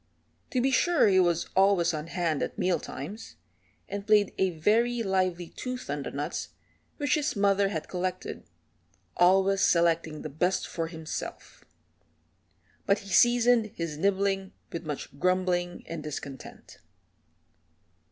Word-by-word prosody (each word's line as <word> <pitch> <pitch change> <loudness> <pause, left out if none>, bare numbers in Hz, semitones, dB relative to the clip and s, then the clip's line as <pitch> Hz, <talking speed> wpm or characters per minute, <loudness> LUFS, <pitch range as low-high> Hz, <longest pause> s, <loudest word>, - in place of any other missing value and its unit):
To 255 - 0
be 265 +2 +2
sure 335 +1 +4
he 190 -2 +4
was 175 -2 +2
always 190 -3 +4
on 155 +1 -4
hand 170 -4 -1
at - - -3
meal 180 -4 +1
times, 185 +14 -8 0.5
and 200 +1 -6
played 210 -2 +4
a 190 - +3
very 225 +8 +1
lively 185 -3 0
tooth 250 - -6
on 145 0 -2
the - - -5
nuts 145 +2 -4 0.5
which 290 -3 0
his 305 0 0
mother 200 -1 +3
had 160 -5 -4
collected, 185 0 -4 0.7
always 195 +2 +4
selecting 165 -4 +2
the 155 - -5
best 175 +6 0
for 165 -1 -3
himself. 160 -2 -7 1.2
But 200 0 +4
he - - -10
seasoned 240 +2 +4
his 165 -3 -4
nibbling 195 0 0 0.2
with 170 -1 -6
much 140 -1 -6
grumbling 180 0 0
and 165 -1 -6
discontent. 140 -2 -8
185 Hz, 135 wpm, -28 LUFS, 165-200 Hz, 1.2 s, sure